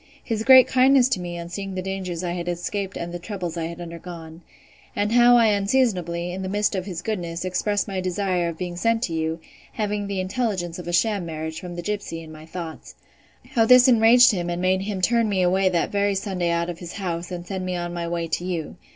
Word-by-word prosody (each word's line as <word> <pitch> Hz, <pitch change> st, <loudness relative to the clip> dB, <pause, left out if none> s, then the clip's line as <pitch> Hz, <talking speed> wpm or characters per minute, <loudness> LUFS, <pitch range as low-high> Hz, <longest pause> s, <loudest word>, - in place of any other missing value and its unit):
His 220 Hz, -2 st, -2 dB
great 260 Hz, +1 st, +9 dB
kindness 260 Hz, 0 st, +5 dB
to 255 Hz, -, 0 dB
me 175 Hz, -1 st, -5 dB
on 170 Hz, 0 st, -7 dB
seeing 195 Hz, +1 st, -5 dB
the 185 Hz, -, -2 dB
dangers 185 Hz, -2 st, -4 dB
I 175 Hz, -, -2 dB
had 175 Hz, 0 st, -4 dB
escaped 190 Hz, +3 st, -3 dB
and 170 Hz, 0 st, -5 dB
the 175 Hz, -, -4 dB
troubles 180 Hz, -3 st, -5 dB
I 165 Hz, -1 st, -2 dB
had 170 Hz, +1 st, -7 dB
undergone. 170 Hz, -1 st, -9 dB, 0.5 s
And 205 Hz, +1 st, 0 dB
how 240 Hz, +1 st, +6 dB
I 230 Hz, -2 st, +5 dB
unseasonably, 195 Hz, -5 st, 0 dB
in 185 Hz, +2 st, -5 dB
the 185 Hz, -, -4 dB
midst 205 Hz, +2 st, +1 dB
of 190 Hz, -1 st, -3 dB
his 175 Hz, -3 st, -5 dB
goodness, 175 Hz, -5 st, -3 dB
expressed 205 Hz, +3 st, 0 dB
my 190 Hz, -2 st, -3 dB
desire 185 Hz, -1 st, -1 dB
of 165 Hz, -, -7 dB
being 175 Hz, -1 st, -5 dB
sent 230 Hz, +4 st, +1 dB
to 170 Hz, -, -2 dB
you, 160 Hz, +1 st, -2 dB, 0.3 s
having 210 Hz, -2 st, -2 dB
the 200 Hz, -1 st, -3 dB
intelligence 185 Hz, -4 st, -2 dB
of 175 Hz, -, -8 dB
a -, -, -2 dB
sham 200 Hz, +3 st, +1 dB
marriage, 160 Hz, 0 st, -5 dB
from 180 Hz, -1 st, -8 dB
the 175 Hz, -, -5 dB
gipsy, 200 Hz, -5 st, -4 dB
in 160 Hz, -, -11 dB
my 155 Hz, 0 st, -12 dB
thoughts. 165 Hz, -1 st, -8 dB, 0.6 s
How 225 Hz, -2 st, +3 dB
this 250 Hz, +1 st, +8 dB
enraged 245 Hz, +1 st, +7 dB
him, 175 Hz, -4 st, -2 dB
and 175 Hz, 0 st, -2 dB
made 185 Hz, +1 st, +1 dB
him 195 Hz, -1 st, -3 dB
turn 230 Hz, +2 st, +2 dB
me 190 Hz, -3 st, +1 dB, 0.2 s
that 175 Hz, -2 st, 0 dB
very 200 Hz, 0 st, +1 dB
Sunday 190 Hz, -3 st, -2 dB
out 170 Hz, 0 st, 0 dB
of 170 Hz, -, -10 dB
his 175 Hz, -1 st, -8 dB
house, 175 Hz, -3 st, -4 dB
and 175 Hz, -1 st, -5 dB
send 190 Hz, 0 st, -4 dB
me 185 Hz, 0 st, -2 dB
on 175 Hz, 0 st, -4 dB
my 170 Hz, -1 st, -3 dB
way 170 Hz, -1 st, -2 dB
to 170 Hz, +2 st, -2 dB
you. 175 Hz, -4 st, -4 dB
185 Hz, 230 wpm, -23 LUFS, 170-205 Hz, 0.6 s, great